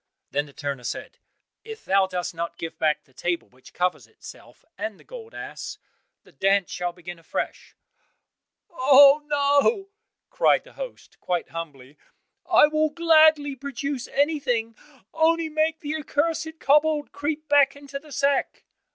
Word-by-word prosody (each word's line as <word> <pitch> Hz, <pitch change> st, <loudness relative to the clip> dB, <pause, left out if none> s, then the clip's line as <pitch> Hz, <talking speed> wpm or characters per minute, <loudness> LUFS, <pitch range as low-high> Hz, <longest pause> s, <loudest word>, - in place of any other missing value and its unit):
Then 145 Hz, +2 st, -1 dB
the 140 Hz, -, -16 dB
turner 140 Hz, -2 st, -5 dB
said, -, -, -6 dB, 0.4 s
"If 445 Hz, -1 st, -10 dB
thou 195 Hz, 0 st, +3 dB
dost 180 Hz, -2 st, -4 dB
not 170 Hz, 0 st, -5 dB
give 165 Hz, -, -6 dB
back 155 Hz, -1 st, +1 dB
the 130 Hz, -, -29 dB
table 175 Hz, +4 st, -3 dB
which 130 Hz, +1 st, -18 dB
covers 180 Hz, 0 st, -1 dB
itself, -, -, -15 dB
and 215 Hz, -2 st, -5 dB
the -, -, -18 dB
gold 465 Hz, -2 st, -11 dB
ass, -, -, -7 dB, 0.5 s
the -, -, -20 dB
dance 195 Hz, -1 st, +1 dB
shall 180 Hz, 0 st, -3 dB
begin 175 Hz, -1 st, -10 dB
afresh." 165 Hz, -, -5 dB, 1.0 s
"Oh, 280 Hz, 0 st, +7 dB
no," 290 Hz, +8 st, +2 dB, 0.4 s
cried -, -, +3 dB
the -, -, -18 dB
host, -, -, -9 dB
quite 175 Hz, -2 st, -2 dB
humbly, 150 Hz, -4 st, -9 dB, 0.5 s
"I -, -, +7 dB
will 310 Hz, +1 st, +1 dB
gladly 310 Hz, -3 st, +4 dB
produce 280 Hz, 0 st, -5 dB
everything, 255 Hz, -6 st, 0 dB, 0.4 s
only 325 Hz, 0 st, +2 dB
make 315 Hz, +1 st, 0 dB
the 300 Hz, +1 st, -3 dB
accursed 320 Hz, +1 st, -2 dB
kobold 300 Hz, +1 st, +2 dB
creep 300 Hz, +2 st, -4 dB
back 285 Hz, -1 st, +4 dB
into 280 Hz, -1 st, -8 dB
the 300 Hz, +1 st, -17 dB
sack." 280 Hz, 0 st, 0 dB
280 Hz, 145 wpm, -24 LUFS, -, 1.0 s, Oh